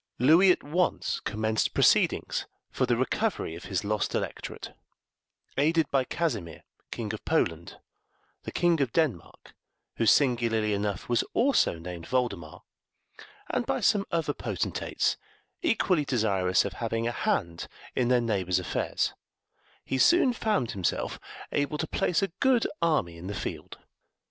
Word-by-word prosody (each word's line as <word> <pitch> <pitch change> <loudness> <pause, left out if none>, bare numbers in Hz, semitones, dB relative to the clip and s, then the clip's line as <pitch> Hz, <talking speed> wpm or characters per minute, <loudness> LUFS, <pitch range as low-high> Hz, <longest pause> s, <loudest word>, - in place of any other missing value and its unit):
Louis 160 +10 +6
at - - 0
once 175 +5 0
commenced 110 0 -1
proceedings - - +2 0.2
for - - 0
the - - +2
recovery - - -1
of 85 - -9
his 95 -1 -2
lost 105 0 -1
electorate; - - -5 0.9
aided 160 +1 +2
by 135 -2 +2
Casimir, 110 - -3 0.3
King 110 -2 -4
of 110 - -7
Poland, 85 - -1 0.6
the - - -7
King 170 -3 +2
of 130 -4 0
Denmark, 145 - -2 0.4
who 115 - +1
singularly 115 -4 +3
enough 100 -1 -2
was 120 -1 +2
also 260 - +3
named 85 0 -8
Voldemar, 100 -11 -2 0.9
and - - -1
by - - 0
some 200 -2 +2
other 165 -2 0
potentates - - -2 0.4
equally 195 - +2
desirous 100 -8 +1
of - - -4
having 115 0 -2
a - - 0
hand 85 -7 -1 0.3
in 125 - +1
their 125 0 +3
neighbour's 95 -6 0
affairs, 90 - -1 0.7
he 130 - -1
soon 340 - +5
found 210 - 0
himself 95 -3 -2 0.3
able 145 +1 0
to 160 - -1
place 175 +4 0
a 195 - 0
good 260 -4 +3 0.2
army 150 - +1
in 90 - -8
the 100 - -4
field. - - -6
120 Hz, 140 wpm, -28 LUFS, 100-160 Hz, 0.9 s, Louis